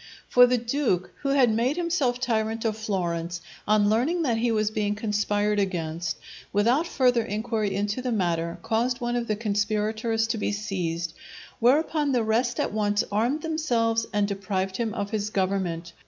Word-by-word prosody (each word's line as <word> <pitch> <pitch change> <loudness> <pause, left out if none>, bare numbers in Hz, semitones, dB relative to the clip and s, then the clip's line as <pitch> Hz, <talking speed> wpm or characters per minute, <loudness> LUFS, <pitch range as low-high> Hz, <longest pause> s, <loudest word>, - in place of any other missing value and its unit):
For 245 0 +7
the 250 0 +2
Duke, 235 -6 0
who 275 - -1
had 270 -4 +4
made 245 +7 +1
himself 320 -8 0
tyrant 225 -2 -1
of 220 -1 +1
Florence, 175 -5 -2 0.3
on 210 -1 +4
learning 265 +11 +2
that 240 -6 +1
he 235 +1 +1
was 215 -1 +1
being 210 -1 -1
conspired 210 -1 0
against, 170 -3 -2 0.3
without 240 +11 +2
further 250 -7 +2
inquiry 215 -2 -2
into 205 +4 -1
the 250 -1 -2
matter, 170 -5 0
caused 240 +3 0
one 240 -1 -1
of 240 -1 -1
the 215 - 0
conspirators 215 +1 0
to 230 -1 -1
be 205 - 0
seized; 175 -5 -3 0.5
whereupon 290 +3 +3
the 240 -2 +2
rest 235 +3 +1
at - - -1
once 205 -1 +1
armed 240 +9 0
themselves 235 -9 0
and 205 -1 +1
deprived 195 -1 -2
him 225 -3 -2
of 200 0 -3
his 210 -1 -1
government. 185 -4 -1
220 Hz, 170 wpm, -26 LUFS, 200-245 Hz, 0.5 s, For